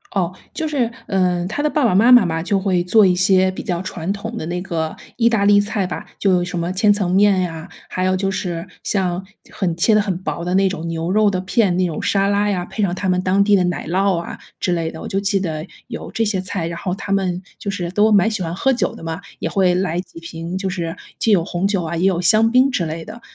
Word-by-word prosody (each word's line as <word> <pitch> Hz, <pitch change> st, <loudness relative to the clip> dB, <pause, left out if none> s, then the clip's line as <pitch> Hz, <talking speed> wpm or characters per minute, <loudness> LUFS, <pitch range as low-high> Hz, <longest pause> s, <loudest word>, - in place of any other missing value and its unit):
哦， 180 Hz, -2 st, 0 dB, 0.2 s
就 320 Hz, -, -2 dB
是， 255 Hz, -6 st, 0 dB, 0.2 s
呃， 180 Hz, -2 st, +1 dB
她 220 Hz, +8 st, -3 dB
的 300 Hz, -, +1 dB
爸 295 Hz, -2 st, 0 dB
爸 225 Hz, -, +3 dB
妈 230 Hz, +6 st, +5 dB
妈 240 Hz, -6 st, +7 dB
嘛， 165 Hz, -1 st, -1 dB
就 195 Hz, +3 st, 0 dB
会 185 Hz, -2 st, +1 dB
做 210 Hz, +3 st, +5 dB
一 180 Hz, -, +4 dB
些 185 Hz, +1 st, +3 dB
比 -, -, -6 dB
较 175 Hz, -1 st, -2 dB
传 185 Hz, -1 st, -4 dB
统 220 Hz, +3 st, -6 dB
的 155 Hz, -, -4 dB
那 175 Hz, +1 st, -3 dB
个 165 Hz, -4 st, -3 dB, 0.2 s
意 230 Hz, -1 st, +4 dB
大 220 Hz, -3 st, +1 dB
利 205 Hz, 0 st, +6 dB
菜 205 Hz, -1 st, -1 dB
吧， 180 Hz, -, -5 dB
就 195 Hz, -, +2 dB
有 175 Hz, -1 st, +2 dB
什 175 Hz, 0 st, -5 dB
么 170 Hz, +2 st, -2 dB
千 205 Hz, +2 st, +3 dB
层 195 Hz, -4 st, -1 dB
面 195 Hz, -1 st, +4 dB
呀， 165 Hz, -1 st, -4 dB, 0.2 s
还 185 Hz, 0 st, -2 dB
有 185 Hz, 0 st, +2 dB
就 195 Hz, +1 st, -1 dB
是 175 Hz, -2 st, -3 dB, 0.2 s
像 185 Hz, -2 st, -1 dB, 0.3 s
很 175 Hz, -4 st, -2 dB
切 220 Hz, -, +3 dB
得 210 Hz, -, +5 dB
很 190 Hz, -3 st, -2 dB
薄 170 Hz, -, -3 dB
的 180 Hz, -, -1 dB
那 195 Hz, 0 st, +3 dB
种 170 Hz, -3 st, -5 dB
牛 165 Hz, +2 st, -2 dB
肉 215 Hz, 0 st, +4 dB
的 185 Hz, -2 st, -1 dB
片， 190 Hz, -1 st, +1 dB
那 185 Hz, 0 st, +2 dB
种 165 Hz, -3 st, -3 dB
沙 195 Hz, 0 st, +1 dB
拉 205 Hz, +1 st, +1 dB
呀， 180 Hz, -3 st, -1 dB
配 215 Hz, -, -5 dB
上 180 Hz, -3 st, +1 dB
他 190 Hz, 0 st, -2 dB
们 180 Hz, 0 st, +2 dB
当 190 Hz, +2 st, +3 dB
地 205 Hz, 0 st, +2 dB
的 185 Hz, -, +3 dB
奶 175 Hz, -4 st, -2 dB
酪 190 Hz, +1 st, +1 dB
啊 170 Hz, -, -6 dB, 0.2 s
之 180 Hz, -, 0 dB
类 165 Hz, -2 st, 0 dB
的， 160 Hz, -, -9 dB
我 -, -, -6 dB
就 195 Hz, -, -1 dB
记 200 Hz, 0 st, +1 dB
得 155 Hz, -3 st, -3 dB, 0.2 s
有 230 Hz, -, -7 dB
这 225 Hz, -, 0 dB
些 205 Hz, -3 st, 0 dB
菜， 185 Hz, -2 st, -3 dB
然 170 Hz, 0 st, -5 dB
后 180 Hz, 0 st, -2 dB
他 200 Hz, -, -6 dB
们 185 Hz, -2 st, 0 dB, 0.2 s
就 200 Hz, -, -4 dB
是 180 Hz, -3 st, -3 dB
都 210 Hz, +3 st, +3 dB
蛮 205 Hz, +2 st, +4 dB
喜 210 Hz, -3 st, -2 dB
欢 170 Hz, 0 st, -3 dB
喝 270 Hz, +7 st, +2 dB
酒 235 Hz, -7 st, 0 dB
的 -, -, -11 dB
嘛， 165 Hz, +1 st, -4 dB, 0.2 s
也 -, -, -2 dB
会 185 Hz, -2 st, +2 dB
来 180 Hz, -2 st, -1 dB
几 175 Hz, -2 st, -8 dB
瓶， 165 Hz, +2 st, -6 dB
就 190 Hz, 0 st, -2 dB
是 170 Hz, -3 st, -3 dB, 0.2 s
既 225 Hz, -, +2 dB
有 175 Hz, -5 st, +4 dB
红 175 Hz, +3 st, -1 dB
酒 195 Hz, -4 st, 0 dB
啊， 165 Hz, +1 st, -3 dB
也 180 Hz, -, +1 dB
有 180 Hz, -2 st, +2 dB
香 215 Hz, +6 st, +4 dB
槟 255 Hz, +3 st, +4 dB
之 175 Hz, -8 st, 0 dB
类 160 Hz, +1 st, -5 dB
的， 225 Hz, +5 st, -10 dB
185 Hz, 290 characters per minute, -20 LUFS, 175-205 Hz, 0.3 s, 妈